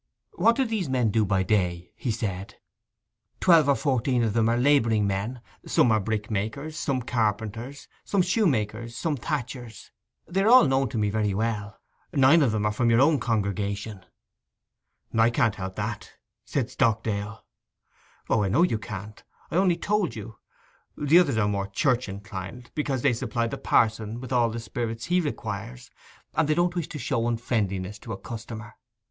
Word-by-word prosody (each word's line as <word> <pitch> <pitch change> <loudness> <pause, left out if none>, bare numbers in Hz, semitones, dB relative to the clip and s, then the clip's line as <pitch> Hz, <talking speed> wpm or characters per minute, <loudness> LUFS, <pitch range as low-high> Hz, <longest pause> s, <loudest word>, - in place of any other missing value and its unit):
'What 235 - +3
do 265 - +1
these 215 - -2
men 125 -4 +1
do 110 0 +2
by 95 -1 +1
day?' 90 -4 0
he 125 - -4
said. 100 -4 -3 0.8
'Twelve 165 -6 +5
or 140 - +5
fourteen 130 -3 +1
of 110 -3 0
them 115 0 +2
are 120 - +2
labouring 120 -5 +3
men. 100 +5 -2 0.3
Some 120 - +3
are 110 - +4
brickmakers, 110 +7 -3
some 135 -6 -1
carpenters, 115 +3 -2 0.2
some 195 -3 +1
shoe 195 +4 +2
makers, 115 -2 -2
some 160 -3 -1
thatchers. 125 -3 -5 0.4
They 190 +3 0
are 200 - +2
all 250 -7 +8
known 135 -2 +1
to 115 - -4
me 105 -1 +1
very 105 -2 0
well. 105 -2 -2 0.3
Nine 140 +4 +6
of 120 -6 +2
'em 105 -1 0
are - - +3
of 120 +1 +2
your 115 0 +4
own 145 +1 +4
congregation.' 100 -2 -2 1.1
'I 115 +1 +5
can't 115 -2 +2
help 95 -2 -6
that,' - - -5 0.3
said - - -2
Stockdale. 110 -1 -1 0.8
'O, 110 - +2
I 100 - 0
know 165 - +4
you 115 -12 +1
can't. 105 -1 -8 0.3
I - - -3
only 185 -2 +3
told 205 -4 0
you. 110 0 -9 0.6
The 150 +4 +5
others 140 -10 +2
are 105 -2 +2
more 100 -1 -1
church 125 +3 0
inclined, 100 +4 -8
because 140 -4 -2
they 140 -3 +4
supply 115 0 -1
the 115 - -4
pa'son 110 0 +1
with 130 +1 -6
all 120 -2 +3
the 115 +1 -4
spirits 115 0 -4
he 180 +1 +2
requires, 120 -3 -5 0.4
and 160 - +2
they 155 - +3
don't 175 0 +2
wish 170 -4 -2
to - - -7
show 120 -3 -1
unfriendliness 105 -4 -2
to 115 -1 -7
a - - -5
customer. 110 -1 -8
115 Hz, 175 wpm, -26 LUFS, 105-135 Hz, 1.1 s, all